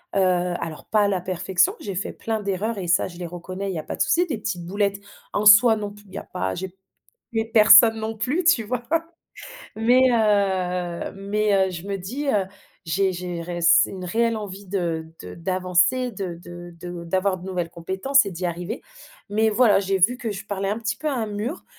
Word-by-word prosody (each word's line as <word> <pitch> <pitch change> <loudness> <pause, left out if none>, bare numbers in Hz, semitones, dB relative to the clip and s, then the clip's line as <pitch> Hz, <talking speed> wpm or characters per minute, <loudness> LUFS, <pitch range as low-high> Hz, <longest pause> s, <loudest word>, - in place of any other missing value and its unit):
heu, - - +3
alors 180 -3 0
pas 215 -1 +2
à - - +3
la 190 -3 -1
perfection, 185 +1 +1
j'ai 200 -2 -6
fait 190 - -3
plein 220 -1 -3
d'erreurs 200 +3 -2
et 185 -3 -4
ça 170 - +2
je 175 - -12
les 180 - -5
reconnais 185 +3 -6
il - - -4
y - - -2
a - - -6
pas - - -5
de - - -5
souci, 350 +2 +3
des 295 -9 -3
petites 180 -5 -4
boulettes 200 +2 -1 0.3
en 205 - -1
soi 220 +2 +8
non 205 -1 -4
plus 205 0 -17
il 190 - -18
y - - -6
a - - -5
pas 95 0 -3
j'ai 190 0 -6 0.6
tué 225 -1 0
personne 220 +1 +8
non 220 0 -4
plus, 255 - -1
tu 330 -9 +4
vois? 240 +3 -3 0.9
Mais, 240 +4 +4
heu, 190 -5 0
mais, 205 +2 0 0.2
heu, - - -5
je 170 -2 -6
me 200 - -1
dis: 255 +11 -5
«Heu, 205 -7 +2 0.4
j'ai 190 +3 +1
j'ai 175 -1 -5
réss 175 0 +4
une 185 -2 -7
réelle 230 +5 0
envie 200 -2 -7
de 170 -4 -2
de - - -9
d'avancer 185 +8 +1
de 190 -3 -5
de 175 0 -11
de 175 0 -7
d'avoir 185 +2 0
de 180 - -12
nouvelles 180 -3 -3
compétences 190 +11 +1
et - - -4
d'y 180 0 -4
arriver». 175 +7 -5 0.5
Mais 220 +2 +2
voilà, 215 -2 +4
j'ai 195 0 0
vu 225 +8 +4
que 235 -3 -4
je 200 +1 -6
parlais 195 -1 -3
un 210 - -2
petit 220 -2 -3
peu 310 - -3
à 290 - -1
un 230 -4 -2
mur 210 - -5
195 Hz, 220 wpm, -23 LUFS, 180-220 Hz, 0.9 s, soi